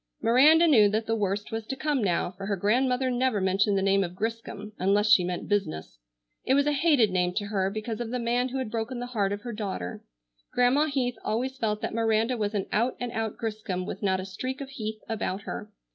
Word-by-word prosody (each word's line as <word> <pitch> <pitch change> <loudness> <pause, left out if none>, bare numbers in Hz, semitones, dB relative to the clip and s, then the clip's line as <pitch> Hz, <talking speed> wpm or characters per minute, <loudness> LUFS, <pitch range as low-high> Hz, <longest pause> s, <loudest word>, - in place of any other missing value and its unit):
Miranda 300 +8 +6
knew 220 -9 +6
that 220 +2 -1
the 225 - 0
worst 205 -1 -2
was 225 0 -3
to 265 - -3
come 285 -3 0
now, 175 -2 0
for 195 +1 -8
her 200 - 0
grandmother 250 +6 +1
never 250 -3 +1
mentioned 195 +2 +2
the 195 - +1
name 195 0 +3
of 175 -1 -5
Griscom 215 -1 -4
unless 205 +3 +3
she 185 - +7
meant 180 0 -3
business. 195 - -2 0.4
It 265 - +2
was 280 0 +3
a 295 - +2
hated 285 - +3
name 180 -1 0
to 205 0 -1
her 195 -2 0
because 215 +2 -4
of 235 - -4
the 250 - -2
man 245 +1 0
who 265 - -4
had 260 -5 -3
broken 230 +2 -3
the 245 - -3
heart 200 -3 +1
of 205 0 -3
her 240 +1 -6
daughter. 195 - -5 0.5
Grandma 250 +5 +4
Heath 255 -4 -1
always 255 +5 -1
felt 215 -4 -1
that - - -3
Miranda 225 +2 +1
was 210 -2 -2
an 195 - 0
out 235 +4 +1
and 245 -1 -3
out 225 -2 -3
Griscom 210 -5 -3
with - - -6
not 190 -2 +1
a 185 - -5
streak 255 +8 -5
of 275 -1 -6
Heath 215 -4 -5
about 205 -3 -2
her. 210 - -6
220 Hz, 230 wpm, -27 LUFS, 200-250 Hz, 0.5 s, she